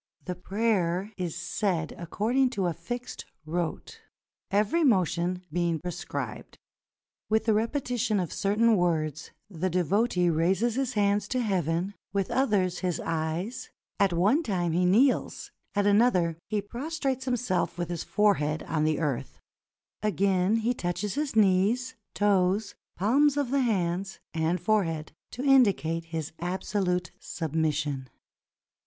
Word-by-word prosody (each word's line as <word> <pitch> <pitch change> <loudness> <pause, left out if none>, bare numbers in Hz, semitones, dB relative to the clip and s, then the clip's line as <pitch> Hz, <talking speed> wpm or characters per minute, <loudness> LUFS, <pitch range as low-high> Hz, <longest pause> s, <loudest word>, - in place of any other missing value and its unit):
The 180 - -2
prayer 190 -1 0
is 175 -4 -3
said 175 -6 -1
according 230 +9 0
to 190 - +1
a 175 - 0
fixed 240 +10 -6 0.2
rote, 165 +1 -4 0.5
every 210 +12 +2
motion 180 - +1
being 170 -1 +1
prescribed. 180 0 -6 0.7
With 220 0 +2
the 220 - +3
repetition 230 -1 0
of 175 -3 -3
certain 215 +2 +3
words 160 -3 0 0.2
the 185 -1 -2
devotee 180 +2 +1
raises 185 +8 +2
his 260 0 -1
hands 205 -1 +1
to 255 - -1
heaven, 185 - 0 0.2
with 195 -2 -1
others 200 -9 +1
his 180 -2 -1
eyes; 165 +8 -3 0.3
at 200 -2 +4
one 200 - +3
time 180 - -1
he 180 +3 +2
kneels, 245 +9 +2 0.2
at 205 0 +2
another 200 -6 +3 0.3
prostrates 270 +1 -3
himself 245 -9 -1
with 175 0 -3
his 175 -2 -3
forehead 165 -8 +1
on 155 -1 0
the 155 -1 +1
earth; 140 -5 -3 0.6
again 195 -1 +2
he 245 - +3
touches 185 0 -3
his 290 -2 -2
knees, 215 +5 +3 0.2
toes, 200 0 +2 0.2
palms 275 +9 +3
of 280 -4 0
the 280 0 +2
hands, 190 -4 -1 0.2
and 165 +2 0
forehead, 165 -5 0 0.2
to 250 - -6
indicate 200 - +3
his 160 -2 -4
absolute 180 0 -1
submis 160 -1 -1
sion. 140 -3 -3
190 Hz, 130 wpm, -28 LUFS, 170-220 Hz, 0.7 s, at